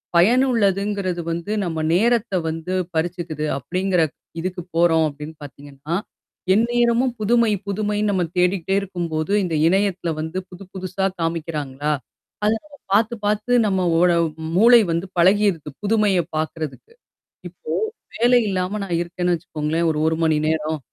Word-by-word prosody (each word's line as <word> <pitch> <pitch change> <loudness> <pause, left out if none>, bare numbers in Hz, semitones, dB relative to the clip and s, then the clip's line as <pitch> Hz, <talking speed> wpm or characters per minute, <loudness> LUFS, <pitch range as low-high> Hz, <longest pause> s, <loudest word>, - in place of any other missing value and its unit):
பயனுள்ளதுங்கிறது 200 -4 +2
வந்து 170 +5 -4
நம்ம 165 -3 -3
நேரத்த 230 +3 +2 0.2
வந்து 165 +3 -4 0.2
பறிச்சுக்குது. 160 -2 -2
அப்டிங்கிறக் 180 +2 0 0.3
இதுக்கு 180 +1 -3
போறோம் 165 -1 +4
அப்டின்னு 150 +2 -8
பாத்தீங்கன்னா, 145 +2 -7 0.6
எந்நேரமும் 240 +3 +2
புதுமை 230 +1 +3 0.2
புதுமைன்னு 210 +1 -1
நம்ம 185 -3 +1
தேடிக்கிட்டே 180 +1 +1
இருக்கும்போது, 175 -3 -3
இந்த 170 -3 -1
இணையத்தில 190 -2 +1
வந்து 160 +4 -4
புது 180 +1 -11
புதுசா 190 0 -3 0.2
காமிக்கிறாங்களா! 150 -4 -2 0.5
அத 215 - +4
நம்ம 290 -1 -16 0.2
பாத்து 225 +3 +3
பாத்து 210 +4 0
நம்ம 190 -2 +1 0.2
ஓட 180 +1 +5 0.4
மூளை 235 +4 +7
வந்து 170 +3 -1
பழகிருது. 185 -3 +3
புதுமைய 210 -3 +2 0.2
பாக்கறதுக்கு. 155 - -4 0.6
இப்போ, 475 - -8 0.4
வேலை 245 +1 +4
இல்லாம 185 +2 -1
நான் 175 -3 -1
இருக்கேன்னு 175 +1 -1
வச்சுக்கோங்களேன், 160 0 -2 0.2
1 160 - 0
மணி 160 -1 +3
நேரம். 155 0 -1
180 Hz, 125 wpm, -21 LUFS, 160-210 Hz, 0.6 s, மூளை